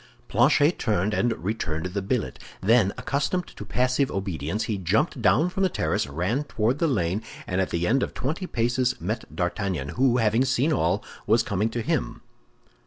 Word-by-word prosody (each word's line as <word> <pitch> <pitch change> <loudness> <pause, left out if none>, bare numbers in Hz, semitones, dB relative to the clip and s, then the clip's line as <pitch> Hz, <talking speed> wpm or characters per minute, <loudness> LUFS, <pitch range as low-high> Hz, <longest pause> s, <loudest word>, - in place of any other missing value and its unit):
Planchet 150 +5 +4
turned 105 -1 0
and 120 +2 +2
returned 90 -6 -2
the 95 +2 -2
billet. 95 - -2 0.2
Then, 105 0 +4
accustomed 150 +6 -1
to - - -7
passive 130 +2 +1
obedience, 95 0 -2
he 105 -3 -2
jumped 105 - +1
down 175 +3 +3
from 195 - -3
the 190 - +3
terrace, - - -1
ran 90 - -1
toward 120 +2 0
the 165 - +2
lane, 95 - 0 0.2
and 90 0 0
at 95 - -1
the 85 +1 -1
end 130 +7 +2
of - - -3
twenty 160 +9 -3
paces 120 +1 0
met - - -4
D'Artagnan, 90 -9 -2
who, 125 - +2
having 115 +1 +3
seen 135 +4 +1
all, 90 - +1 0.2
was 110 +2 +4
coming 105 +2 0
to 115 0 -3
him. - - -2
110 Hz, 175 wpm, -25 LUFS, 95-130 Hz, 0.2 s, Planchet